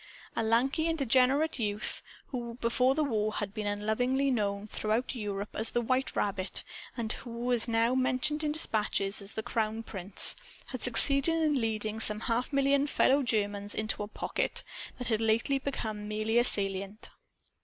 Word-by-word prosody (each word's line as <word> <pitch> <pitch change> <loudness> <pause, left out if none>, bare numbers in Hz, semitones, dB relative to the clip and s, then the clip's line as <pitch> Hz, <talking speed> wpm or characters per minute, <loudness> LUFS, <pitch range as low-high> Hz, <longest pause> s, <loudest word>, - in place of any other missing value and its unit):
A - - 0
lanky 255 +8 +1
and 330 0 0
degenerate 270 +3 +2
youth 210 -1 -3 0.3
(who 240 -3 -5
before 250 +2 +1
the 310 - +1
war 215 -6 -1
had 205 -2 -4
been 210 -1 -4
unlovingly 245 +7 0
known 200 -4 -1
throughout 215 +4 -2
Europe 205 -4 -4
as 220 +1 -1
the 240 - 0
"White 255 +3 -1
Rabbit" 195 -2 -1 0.3
and 225 -2 -2
who 240 +1 -2
now 230 0 +2
was 260 - +2
mentioned 300 +4 +1
in 300 - 0
dispatches 210 -9 0
as 200 +1 -5
the 220 - -4
"Crown 225 -1 -2
Prince") 195 -3 +1 0.3
had 255 -3 -6
succeeded 275 +5 +6
in 305 -5 +1
leading 220 -1 -1
some 215 -1 0
half 240 +3 -1
million 275 0 +2
fellow 280 -1 +3
Germans 205 -4 0
into 215 -1 -2
a 205 - -3
"pocket" 210 - -2 0.3
that 250 -2 -3
had 220 -1 +1
lately 225 +5 +2
been 220 -6 -4
merely 215 +2 +1
a - - +4
salient. 195 -1 0
230 Hz, 165 wpm, -30 LUFS, 210-260 Hz, 0.3 s, succeeded